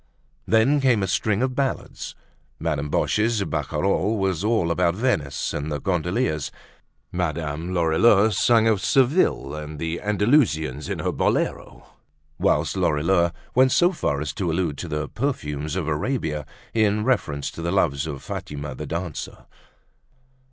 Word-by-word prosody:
Then 115 Hz, +6 st, +4 dB
came 125 Hz, -6 st, +3 dB
a -, -, 0 dB
string 100 Hz, +4 st, +1 dB
of 130 Hz, -1 st, 0 dB
ballads; 135 Hz, 0 st, -3 dB, 0.4 s
Madame 75 Hz, -3 st, -2 dB
Boche's 105 Hz, +6 st, +1 dB
barcarolle 90 Hz, +7 st, 0 dB
was 95 Hz, -3 st, 0 dB
all 105 Hz, -6 st, +1 dB
about 85 Hz, +1 st, +2 dB
Venice 100 Hz, -, -1 dB
and 75 Hz, +1 st, -3 dB
the 75 Hz, -, -2 dB
gondoliers; 90 Hz, -1 st, -1 dB, 0.6 s
Madame 80 Hz, -1 st, -2 dB
Lorilleux 95 Hz, +5 st, +4 dB
sang 115 Hz, +1 st, +4 dB
of 110 Hz, -4 st, +2 dB
Seville 130 Hz, -, +2 dB
and 75 Hz, 0 st, -6 dB
the 80 Hz, +2 st, -3 dB
Andalusians 105 Hz, -, +1 dB
in -, -, -2 dB
her -, -, -1 dB
bolero; -, -, -1 dB, 0.5 s
whilst -, -, +1 dB
Lorilleux 85 Hz, +4 st, +2 dB, 0.2 s
went 130 Hz, +1 st, +5 dB
so 175 Hz, +6 st, +4 dB
far 70 Hz, -, -1 dB
as 75 Hz, -2 st, -3 dB
to 90 Hz, +2 st, -2 dB
allude 80 Hz, -4 st, -1 dB
to 85 Hz, -, -5 dB
the 75 Hz, -1 st, -3 dB
perfumes 75 Hz, -, -3 dB
of 90 Hz, -5 st, -2 dB
Arabia, 75 Hz, -, -2 dB, 0.3 s
in 105 Hz, -1 st, +2 dB
reference 75 Hz, -, 0 dB
to -, -, -8 dB
the 85 Hz, +1 st, -1 dB
loves 80 Hz, -7 st, +1 dB
of 70 Hz, -3 st, -6 dB
Fatima 70 Hz, -1 st, -5 dB
the -, -, -7 dB
dancer. 85 Hz, 0 st, -5 dB
90 Hz, 145 wpm, -24 LUFS, 75-110 Hz, 0.6 s, went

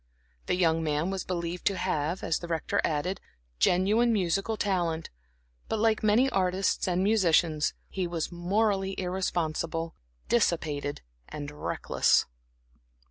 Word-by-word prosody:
The -, -, +2 dB
young 165 Hz, -3 st, +2 dB
man 155 Hz, +3 st, 0 dB
was 195 Hz, -1 st, -3 dB
believed 175 Hz, -1 st, -3 dB
to 195 Hz, -, +1 dB
have, 175 Hz, -1 st, -1 dB
as 165 Hz, -, 0 dB
the 170 Hz, -, -7 dB
Rector 165 Hz, -2 st, 0 dB
added, 170 Hz, +6 st, -1 dB, 0.4 s
genuine 210 Hz, +7 st, +3 dB
musical 195 Hz, +2 st, 0 dB
talent; 175 Hz, -6 st, -1 dB, 0.6 s
but -, -, 0 dB
like 220 Hz, 0 st, +2 dB
many 215 Hz, +5 st, +4 dB
artists 190 Hz, -1 st, +1 dB
and 180 Hz, 0 st, +1 dB
musicians, 170 Hz, -7 st, +3 dB
he 185 Hz, -2 st, -2 dB
was 170 Hz, -1 st, -3 dB
morally 195 Hz, +2 st, 0 dB
irresponsible, 165 Hz, -3 st, -2 dB, 0.3 s
dissipated 155 Hz, -, 0 dB, 0.3 s
and 145 Hz, -1 st, -6 dB
reckless. 150 Hz, -, +1 dB
180 Hz, 125 wpm, -28 LUFS, 165-195 Hz, 0.6 s, many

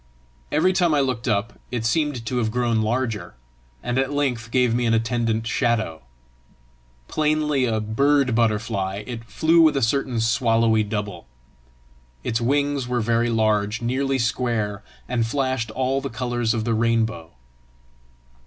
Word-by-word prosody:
Every 175 Hz, +5 st, +3 dB
time 175 Hz, -4 st, +2 dB
I -, -, +3 dB
looked 130 Hz, -3 st, -1 dB
up, 110 Hz, 0 st, -1 dB
it 115 Hz, -2 st, -3 dB
seemed 140 Hz, -1 st, 0 dB
to 125 Hz, +3 st, -2 dB
have 110 Hz, -2 st, 0 dB
grown 120 Hz, -1 st, +1 dB
larger, 115 Hz, -, -2 dB, 0.5 s
and 125 Hz, +1 st, 0 dB
at 135 Hz, +1 st, 0 dB
length 130 Hz, -6 st, -1 dB
gave 125 Hz, -1 st, +2 dB
me 120 Hz, 0 st, +1 dB
an 115 Hz, -, +3 dB
attendant 115 Hz, -1 st, 0 dB
shadow. 115 Hz, -, 0 dB, 1.1 s
Plainly 150 Hz, -3 st, +1 dB
a 110 Hz, -2 st, 0 dB
bird 130 Hz, +5 st, +2 dB
butterfly, 105 Hz, -3 st, 0 dB
it 115 Hz, -1 st, -7 dB
flew 160 Hz, +9 st, +3 dB
with 155 Hz, -3 st, +4 dB
a -, -, +1 dB
certain 125 Hz, 0 st, 0 dB
swallowy 115 Hz, -1 st, +2 dB
double. 105 Hz, -, -5 dB, 1.0 s
Its 115 Hz, +1 st, -1 dB
wings 140 Hz, +1 st, 0 dB
were 125 Hz, 0 st, 0 dB
very 115 Hz, +1 st, +1 dB
large, 110 Hz, -1 st, +1 dB
nearly 135 Hz, +3 st, 0 dB
square, 115 Hz, -4 st, -1 dB, 0.2 s
and 120 Hz, -2 st, 0 dB
flashed 130 Hz, -2 st, -1 dB
all 130 Hz, +4 st, -1 dB
the 140 Hz, -, -4 dB
colours 120 Hz, -1 st, -1 dB
of 110 Hz, -, -1 dB
the 115 Hz, -, +1 dB
rainbow. 110 Hz, -7 st, 0 dB
120 Hz, 145 wpm, -23 LUFS, 110-130 Hz, 1.1 s, with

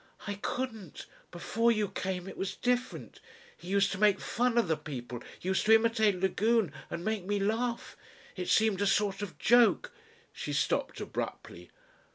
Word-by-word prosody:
"I 205 Hz, -, -2 dB
couldn't. 225 Hz, -, -4 dB, 0.2 s
Before 225 Hz, +7 st, +1 dB
you 215 Hz, -2 st, +1 dB
came 185 Hz, -1 st, -4 dB
it -, -, -8 dB
was 195 Hz, 0 st, -3 dB
different. 245 Hz, 0 st, -2 dB, 0.4 s
He -, -, -14 dB
used 200 Hz, +1 st, +2 dB
to 190 Hz, -, -4 dB
make 205 Hz, -2 st, +4 dB
fun 240 Hz, 0 st, 0 dB
of 235 Hz, -, +3 dB
the 160 Hz, -, +2 dB
people 125 Hz, -6 st, -7 dB, 0.2 s
used 190 Hz, +1 st, 0 dB
to 220 Hz, -, +8 dB
imitate 220 Hz, -4 st, +2 dB
Lagune 205 Hz, 0 st, +2 dB, 0.2 s
and 170 Hz, -, -5 dB
make 215 Hz, -3 st, -1 dB
me 205 Hz, +2 st, -1 dB
laugh. 230 Hz, +4 st, -1 dB, 0.4 s
It 180 Hz, -1 st, -4 dB
seemed 215 Hz, -3 st, +3 dB
a 205 Hz, -, +2 dB
sort 200 Hz, 0 st, +1 dB
of 205 Hz, -3 st, -6 dB
joke." 245 Hz, -, +4 dB, 0.4 s
She -, -, -5 dB
stopped -, -, -1 dB
abruptly. -, -, -6 dB
205 Hz, 165 wpm, -30 LUFS, 190-230 Hz, 0.4 s, to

